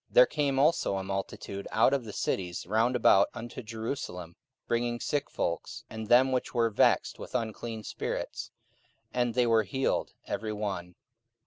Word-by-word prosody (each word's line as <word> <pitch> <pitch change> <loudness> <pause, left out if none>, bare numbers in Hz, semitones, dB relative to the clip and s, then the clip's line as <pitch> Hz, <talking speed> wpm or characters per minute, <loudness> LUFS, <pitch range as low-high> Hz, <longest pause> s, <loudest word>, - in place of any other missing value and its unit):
44:005:016 - - -29
There - - +10
came 140 - 0
also 140 -8 +3
a 95 - -3
multitude 95 0 -4
out - - +4
of 135 -4 0
the 105 - -6
cities 90 -3 -2
round 110 +6 +2
about 100 -4 +5
unto 120 +2 -6
Jerusalem, 110 -7 -5 0.3
bringing 120 0 0
sick 145 +2 -1
folks, 85 -1 -3
and 110 -1 -5
them 130 +3 +6
which 130 0 -1
were 115 -1 +3
vexed - - +3
with - - -8
unclean 115 -1 -3
spirits: - - -4 0.6
and 120 -2 0
they 125 -1 +4
were 115 -1 +4
healed 130 +6 -1
every 110 0 -3
one. 95 -4 -4
115 Hz, 160 wpm, -29 LUFS, 100-125 Hz, 0.6 s, There